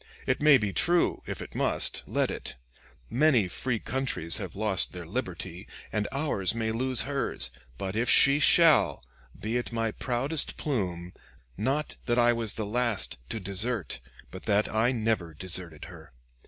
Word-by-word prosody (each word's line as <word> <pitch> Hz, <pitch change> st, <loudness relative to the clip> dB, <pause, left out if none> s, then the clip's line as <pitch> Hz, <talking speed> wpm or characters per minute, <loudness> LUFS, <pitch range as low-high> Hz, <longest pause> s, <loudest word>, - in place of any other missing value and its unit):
It -, -, 0 dB
may 150 Hz, -2 st, +7 dB
be 105 Hz, -5 st, -2 dB
true; 175 Hz, 0 st, +2 dB
if -, -, -5 dB
it -, -, -12 dB
must, -, -, +1 dB
let -, -, 0 dB
it. -, -, -6 dB, 0.5 s
Many 125 Hz, -6 st, +3 dB
free 120 Hz, +6 st, -2 dB
countries 125 Hz, -10 st, +2 dB
have 95 Hz, -6 st, -6 dB
lost 100 Hz, -2 st, 0 dB
their 90 Hz, -1 st, -7 dB
liberty, 90 Hz, -2 st, -5 dB, 0.2 s
and 105 Hz, -1 st, -1 dB
ours 130 Hz, -8 st, +1 dB
may 110 Hz, -1 st, -1 dB
lose 130 Hz, +2 st, +2 dB
hers; 135 Hz, -, -1 dB, 0.3 s
but 95 Hz, +6 st, -4 dB
if 115 Hz, +2 st, 0 dB
she 140 Hz, +1 st, +6 dB
shall, 165 Hz, -, +4 dB, 0.3 s
be 110 Hz, +3 st, -2 dB
it 120 Hz, -, -4 dB
my 115 Hz, -1 st, -1 dB
proudest 135 Hz, +7 st, -1 dB
plume, 90 Hz, -, -3 dB, 0.4 s
not 135 Hz, +9 st, -2 dB
that 120 Hz, 0 st, +1 dB
I 120 Hz, 0 st, +5 dB
was 115 Hz, -3 st, -1 dB
the 110 Hz, -, -4 dB
last 110 Hz, -, -1 dB
to 115 Hz, -, -3 dB
desert, 100 Hz, -, -2 dB, 0.3 s
but 95 Hz, -, -9 dB
that 105 Hz, 0 st, +2 dB
I 115 Hz, +3 st, +2 dB
never 110 Hz, -9 st, -1 dB
deserted 90 Hz, -2 st, -6 dB
her. -, -, -13 dB
110 Hz, 160 wpm, -28 LUFS, 95-130 Hz, 0.5 s, may